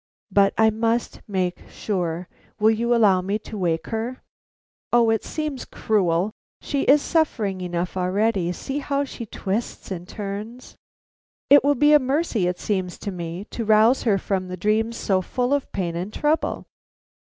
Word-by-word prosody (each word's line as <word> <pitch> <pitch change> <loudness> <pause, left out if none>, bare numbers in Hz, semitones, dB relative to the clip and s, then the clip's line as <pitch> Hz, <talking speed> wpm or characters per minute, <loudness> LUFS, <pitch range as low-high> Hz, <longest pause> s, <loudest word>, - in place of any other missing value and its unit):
But 200 0 +4
I 220 0 +5
must 230 +2 -1
make 185 -3 -2
sure. 175 -4 -3 0.3
Will 215 +1 +5
you 235 +2 +1
allow 200 -5 +4
me 195 +3 -1
to - - -7
wake 170 -5 -1
her?" 235 +3 -3 0.7
"O 235 -2 +4
it 225 - 0
seems 305 -4 -4
cruel! 185 -2 0 0.3
She 280 -1 -2
is 285 +2 +5
suffering 220 - 0
enough 175 0 -3
already. 185 0 +1
See 270 +10 -4
how 280 0 -1
she 235 -4 -8
twists 205 +2 -4
and 180 -1 -5
turns!" 210 +5 -7 0.8
"It 285 - +8
will 285 +1 +3
be 295 +1 +5
a 300 - +8
mercy, 260 - 0
it 180 0 -1
seems 185 -4 -2
to 200 - -5
me, 175 +1 -6
to 235 - -3
rouse 220 +4 +4
her 210 -5 +2
from 190 -1 -2
dreams 220 +5 0
so 190 -2 +1
full 250 +7 -1
of 285 -1 -1
pain 175 -3 -2
and 180 +4 -4
trouble." 305 +6 0
215 Hz, 165 wpm, -23 LUFS, 185-240 Hz, 0.8 s, It